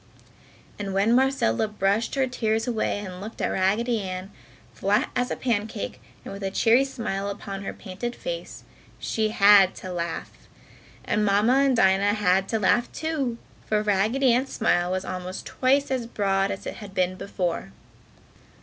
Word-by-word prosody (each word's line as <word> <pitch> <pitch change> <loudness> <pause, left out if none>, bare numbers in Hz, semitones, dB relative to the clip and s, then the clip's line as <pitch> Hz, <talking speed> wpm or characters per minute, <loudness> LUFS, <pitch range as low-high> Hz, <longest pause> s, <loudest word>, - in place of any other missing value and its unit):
And 195 -2 -4
when 205 +4 +3
Marcella 255 - +2
brushed 210 +3 0
her 270 -1 +2
tears 225 -2 -1
away 225 -3 0
and 180 0 -8
looked 220 +3 -8
at - - 0
Raggedy 215 +5 +1
Ann, 185 0 -5 0.4
flat 200 +2 +1
as 250 0 0
a - - -2
pancake 220 -3 -2 0.2
and - - -6
with 200 - -8
a 195 - -1
cheery 230 +6 +4
smile 200 -6 -3
upon 195 0 -6
her - - -4
painted 235 +6 -6
face, - - -6 0.3
she 220 -1 -1
had 200 -3 +6
to 185 - -7
laugh. 170 -1 -4 0.7
And 210 - +1
Mamma 210 +5 +3
and 275 -2 +3
Dinah 195 +1 +4
had 190 -2 +2
to 225 - +1
laugh, 220 +4 +2
too, 290 -7 -2 0.3
for 215 -1 +1
Raggedy 220 +6 +2
Ann's 260 +3 0
smile 175 -5 +1
was 185 +1 -2
almost 185 0 -5
twice 275 +2 +1
as 250 -3 -1
broad 195 -3 0
as 195 - -5
it - - -5
had 200 -2 -10
been 185 0 +1
before. 180 - -3
205 Hz, 165 wpm, -25 LUFS, 195-240 Hz, 0.7 s, had